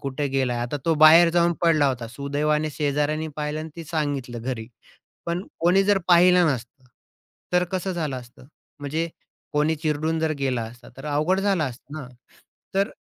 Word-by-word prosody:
कुठे 140 0 -2
गेलाय, 130 -3 0
आता 120 +4 -2
तो 165 - +3
बाहेर 165 +2 +8
जाऊन 170 0 +3
पडला 160 -4 +4
होता. 120 -3 -3
सुदैवाने 150 +4 -1
शेजाऱ्याने 150 +2 -1
पाहिलं 150 0 -3
आणि 160 0 -7
ते 165 - -7
सांगितलं 140 -7 -3
घरी. 120 -3 -4 0.6
पण 170 +2 -2 0.2
कोणी 180 +4 +4
जर 205 0 +3
पाहिलं 180 0 +6
नसतं, 120 +2 -9 0.7
तर 180 - +4
कसं 190 0 -2
झालं 155 -6 -2
असतं? 125 +1 -13 0.3
म्हणजे 155 +4 -2 0.5
कोणी 150 +2 +2
चिरडून 155 +1 -1
जर 160 -1 +1
गेला 130 -4 0
असता, 120 +2 -11
तर 135 - -9
अवघड 155 +6 +1
झालं 195 -5 +1
असतं 130 +2 -7
ना? 135 - -8 0.7
तर 195 +2 +1
150 Hz, 165 wpm, -24 LUFS, 135-170 Hz, 0.7 s, बाहेर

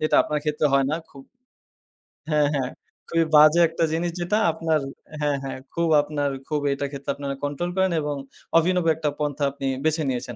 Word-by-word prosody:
যেটা 155 - +2
আপনার 150 - -2
ক্ষেত্রে 150 0 +1
হয় 135 -1 +4
না 155 - 0
খুব 135 - -13 1.1
হ্যাঁ, 150 -2 +3
হ্যাঁ, 130 -3 -1 0.4
খুবই 165 0 +2
বাজে 155 +3 +7
একটা 165 +1 -2
জিনিস 170 +2 -1
যেটা 175 +5 0
আপনার 160 -1 0 0.4
হ্যাঁ, 145 -1 +1
হ্যাঁ, 135 - -5 0.2
খুব 170 0 0
আপনার 145 -1 -2 0.2
খুব 150 -1 -1
এটার 140 0 -3
ক্ষেত্রে 140 -1 -4
আপনারা 140 -1 -4
কন্ট্রোল 145 +5 -2
করেন 190 -1 +3
এবং 150 -1 -2 0.4
অভিনব 180 +1 +2
একটা 155 -1 -1
পন্থা 145 -1 -2
আপনি 135 0 -5 0.2
বেছে 160 0 +1
নিয়েছেন। 125 -1 -3
150 Hz, 180 wpm, -24 LUFS, 140-165 Hz, 1.1 s, বাজে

